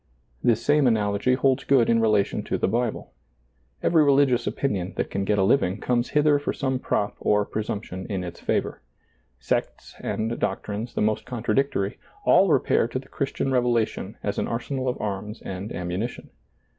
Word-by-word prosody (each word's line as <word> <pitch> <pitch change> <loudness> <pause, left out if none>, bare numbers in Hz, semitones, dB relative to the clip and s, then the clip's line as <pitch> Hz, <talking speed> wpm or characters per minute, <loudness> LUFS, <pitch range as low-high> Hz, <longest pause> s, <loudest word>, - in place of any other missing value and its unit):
This 115 -1 +2
same 145 -2 +4
analogy 105 +2 +2
holds 130 0 +2
good 130 -4 +4
in 115 -1 +3
relation 105 -3 +2
to - - -1
the - - +1
Bible. 115 +2 -2 0.7
Every 160 -3 +4
religious 135 -4 +3
opinion 95 -9 -2
that - - -2
can 100 0 -1
get 105 +1 +1
a 95 - +3
living 95 -3 +2
comes 120 -1 0
hither 150 -1 +4
for 145 - -2
some 130 -2 -1
prop 105 -5 -1
or 105 -1 +2
pre 110 - -3
sumption 100 -3 -5
in 95 -3 -3
its 85 -1 -7
favor. - - -1 0.6
Sects - - -2
and 115 +2 -2
doctrines 105 +3 -3
the - - 0
most 110 0 0
contradictory, 120 -3 -1 0.3
all 195 - +6
repair 135 -5 +3
to 120 - -4
the 130 +1 -8
Christian 135 -1 -2
Revelation 120 -3 0
as - - -1
an - - -1
arsenal 130 +2 -2
of 125 - -3
arms 105 +1 -4
and 95 +2 -5
ammuni 90 +6 -3
tion. - - -13
115 Hz, 175 wpm, -25 LUFS, 100-130 Hz, 0.7 s, all